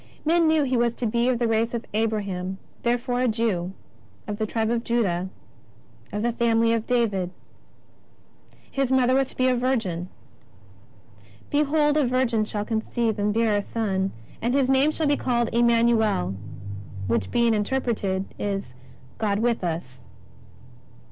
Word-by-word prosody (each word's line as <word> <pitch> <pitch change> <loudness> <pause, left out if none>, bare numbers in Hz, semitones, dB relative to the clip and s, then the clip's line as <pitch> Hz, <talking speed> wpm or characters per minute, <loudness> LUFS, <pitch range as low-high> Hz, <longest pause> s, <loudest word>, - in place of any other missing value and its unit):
Men 335 +1 +4
knew 315 -1 +4
He 260 -2 0
was 235 0 +1
to 245 - -3
be 235 +2 +1
of 250 - +2
the 235 0 +1
race 225 +1 +1
of 235 - -4
Abraham, 200 -4 -1 0.2
therefore 245 +1 0
a 255 - +3
Jew, 215 -6 0 0.5
of 210 0 -4
the 215 - 0
Tribe 225 +1 0
of 235 -1 0
Judah, 190 -7 0 0.8
of 210 +1 -2
the 240 - +2
family 230 -1 +2
of 230 -1 -1
David. 215 -7 +1 1.4
His 270 -2 0
Mother 255 -1 +4
was 270 0 +2
to - - -15
be 255 - +3
a 255 - +3
Virgin: 220 -9 -1 0.7
" - - -26
Behold 295 0 +2
a 290 -4 +3
virgin 245 -3 +1
shall 210 -1 -3
conceive 225 0 -1
and 205 +1 +1
bear 225 -1 +2
a 205 - +2
Son, 195 -3 -1 0.3
and 240 +3 +1
His 270 -2 +3
name 270 +3 +4
shall 310 +1 -1
be 290 0 +3
called 240 -2 0
Emmanuel, 230 - +3 0.7
which 110 -2 0
being 235 -1 +3
interpreted, 210 -4 -1
is 195 -10 -3 0.5
God 205 -2 +1
with 230 -1 0
us." 160 -7 -4
230 Hz, 155 wpm, -25 LUFS, 205-250 Hz, 1.4 s, Men